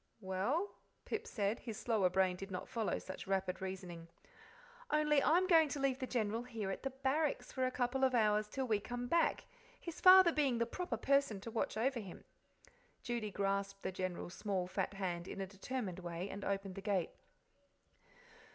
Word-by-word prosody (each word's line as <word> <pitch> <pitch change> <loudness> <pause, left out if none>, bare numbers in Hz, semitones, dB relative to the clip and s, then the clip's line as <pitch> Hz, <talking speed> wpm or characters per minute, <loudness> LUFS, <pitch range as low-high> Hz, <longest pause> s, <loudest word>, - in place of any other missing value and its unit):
"Well?" 220 - -1 0.3
Pip 435 - -3
said; 205 0 -1
his 225 -3 -6
slower 215 -6 +2
brain 185 0 +2
did 195 +2 -7
not 180 -1 -5
follow 225 -3 -1
such 190 - -8
rapid 190 -1 -1
reasoning. 180 -3 -6 0.8
"Only 300 -1 +3
I'm 345 +6 +4
going 325 -4 +5
to 285 - -3
leave 270 -1 +1
the 260 - -3
General 225 -2 0
here 225 -5 -4
at - - -5
the 270 - -2
Barracks 270 +3 -1
for 260 -1 0
a - - +1
couple 255 +1 -1
of 260 -1 +4
hours 210 -2 +3
till 265 +4 -3
we 215 -4 +2
come 245 +3 -4
back, 335 +7 +2 0.3
his 340 -2 -7
father 370 -1 +9
being 280 -6 +2
the 235 - +2
proper 255 0 -3
person 275 -4 +2
to 230 - -7
watch 220 - -1
over 250 +2 +1
him." 195 -5 -9 0.8
Judy 235 -3 -2
grasped 195 0 -1
the - - -1
General's 185 -1 -4
small. 195 -4 -1
fat 190 +2 -2
hand 180 -2 -3
in - - -6
a 195 - -1
determined 195 0 -4
way, 175 +1 -5
and 200 - -6
opened 195 -1 -2
the 195 - -7
gate. 195 -4 0
215 Hz, 185 wpm, -36 LUFS, 190-265 Hz, 0.8 s, father